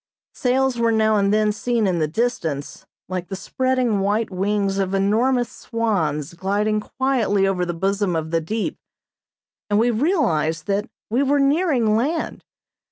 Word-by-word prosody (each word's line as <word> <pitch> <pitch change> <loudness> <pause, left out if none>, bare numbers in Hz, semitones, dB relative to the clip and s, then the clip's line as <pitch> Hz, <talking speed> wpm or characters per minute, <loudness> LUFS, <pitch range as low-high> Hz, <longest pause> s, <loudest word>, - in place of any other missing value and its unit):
Sails 260 -1 +1
were 230 -1 +3
now 220 -1 +3
and 200 0 +2
then 215 0 +3
seen 230 +1 0
in 180 -3 +1
the 155 - +1
distance, 160 - -3 0.2
like 180 0 -4
the 195 - -5
spreading 255 +1 0
white 205 +2 0
wings 195 +1 0
of 195 0 0
enormous 235 +5 +2
swans 175 - -2
gliding 205 +4 0
quietly 230 -5 0
over 180 -2 0
the 175 - -2
bosom 195 +1 0
of 160 0 -3
the 165 -1 +1
deep, 215 +7 -3 0.9
and 205 - +2
we 235 +3 +3
realized 215 - +1
that 200 +1 -1 0.2
we 245 +4 +2
were 280 +1 +2
nearing 275 -6 +2
land. 300 +8 -1
210 Hz, 155 wpm, -22 LUFS, 190-245 Hz, 0.9 s, were